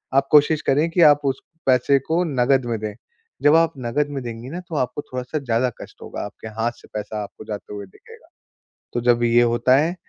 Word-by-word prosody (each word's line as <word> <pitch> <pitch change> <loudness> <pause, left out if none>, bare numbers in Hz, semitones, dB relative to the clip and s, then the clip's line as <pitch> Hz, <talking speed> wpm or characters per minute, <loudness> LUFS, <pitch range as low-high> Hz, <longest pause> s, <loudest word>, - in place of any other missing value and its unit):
आप 135 0 +3
कोशिश 150 +1 +5
करें 150 +5 +3
कि 175 - +2
आप 145 0 +1
उस 135 -1 0 0.3
पैसे 130 +2 +4
को 170 +2 +2
नकद 135 -4 +2
में 115 -1 -2
दें। 105 0 -4 0.5
जब 145 +2 +6
आप 165 0 +4
नकद 145 +5 0
में 140 -2 -5
देंगी 120 +1 -7
ना, 170 +5 -5
तो 175 -3 -8
आपको 130 0 -1
थोड़ा-सा 130 +3 -5
ज़्यादा 125 -2 0
कष्ट - - -12
होगा, - - -6
आपके 105 +2 -10
हाथ 115 +1 +1
से - - -17
पैसा 105 0 -4
आपको 105 +1 -11
जाते 105 -1 -7
हुए 100 -1 -6
दिखेगा। 95 - -18 0.7
तो 120 - 0
जब 120 0 +3
ये 120 +1 +4
होता 120 +2 +3
है, 160 +5 +1
130 Hz, 215 wpm, -22 LUFS, 115-145 Hz, 0.7 s, जब